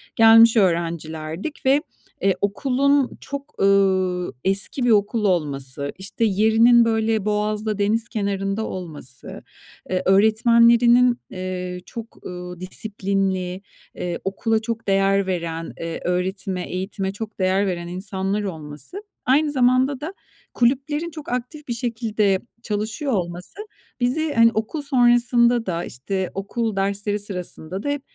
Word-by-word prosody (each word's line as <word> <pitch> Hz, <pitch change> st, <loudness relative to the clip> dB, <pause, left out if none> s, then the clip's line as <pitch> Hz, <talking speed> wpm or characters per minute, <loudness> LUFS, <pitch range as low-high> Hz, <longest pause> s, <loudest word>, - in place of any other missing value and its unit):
Gelmiş 225 Hz, 0 st, +7 dB
öğrencilerdik 165 Hz, -, -1 dB
ve, 275 Hz, +3 st, +4 dB, 0.4 s
eee, 195 Hz, -1 st, +3 dB
okulun 270 Hz, +6 st, +1 dB
çok, 280 Hz, +1 st, -7 dB
ııı, 190 Hz, -4 st, +2 dB
eski 195 Hz, +7 st, 0 dB
bir 245 Hz, -, +3 dB
okul 210 Hz, +1 st, +2 dB
olması, 140 Hz, -6 st, -1 dB
işte, 195 Hz, +4 st, -2 dB
yerinin, 225 Hz, +3 st, +5 dB
böyle, 220 Hz, -2 st, +1 dB
boğazda, 210 Hz, 0 st, -1 dB
deniz 220 Hz, +3 st, 0 dB
kenarında 200 Hz, -1 st, -2 dB
olması, 150 Hz, -8 st, -7 dB, 0.5 s
eee, 185 Hz, 0 st, 0 dB
öğretmenlerinin, 235 Hz, +4 st, +5 dB
eee, 180 Hz, -1 st, -5 dB
çok, 230 Hz, -1 st, -10 dB
ııı, 180 Hz, -1 st, -7 dB
disiplinli, 190 Hz, -1 st, -2 dB, 0.4 s
ııı, 175 Hz, -1 st, -2 dB
okula 220 Hz, +3 st, 0 dB
çok 225 Hz, -1 st, -4 dB
değer 195 Hz, 0 st, +2 dB
veren, 165 Hz, -2 st, -3 dB
eee, 165 Hz, 0 st, -4 dB
öğretime, 180 Hz, +1 st, -1 dB
eğitime 190 Hz, +1 st, -3 dB
çok 210 Hz, +1 st, -8 dB
değer 190 Hz, +2 st, +2 dB
veren 175 Hz, -2 st, -3 dB
insanlar 190 Hz, +3 st, -2 dB
olması, 160 Hz, -, -7 dB, 0.3 s
aynı 290 Hz, +3 st, +3 dB
zamanda 255 Hz, +1 st, +2 dB
da 335 Hz, +6 st, -5 dB, 0.4 s
kulüplerin 280 Hz, +7 st, +1 dB
çok 305 Hz, -2 st, -9 dB
aktif 250 Hz, +5 st, -4 dB
bir 240 Hz, -, -1 dB
şekilde 220 Hz, -5 st, 0 dB, 0.2 s
çalışıyor 220 Hz, +7 st, -2 dB
olması 180 Hz, -, -4 dB, 0.4 s
bizi, 290 Hz, +5 st, 0 dB
hani, 230 Hz, 0 st, +6 dB
okul 220 Hz, +8 st, -2 dB
sonrasında 240 Hz, -3 st, +3 dB
da, 170 Hz, -2 st, -2 dB
işte, 185 Hz, +10 st, -4 dB
okul 215 Hz, +2 st, -2 dB
dersleri 200 Hz, +1 st, -1 dB
sırasında 185 Hz, -2 st, -4 dB
da 285 Hz, -, -2 dB
hep 285 Hz, -1 st, -1 dB
205 Hz, 125 wpm, -22 LUFS, 185-235 Hz, 0.5 s, Gelmiş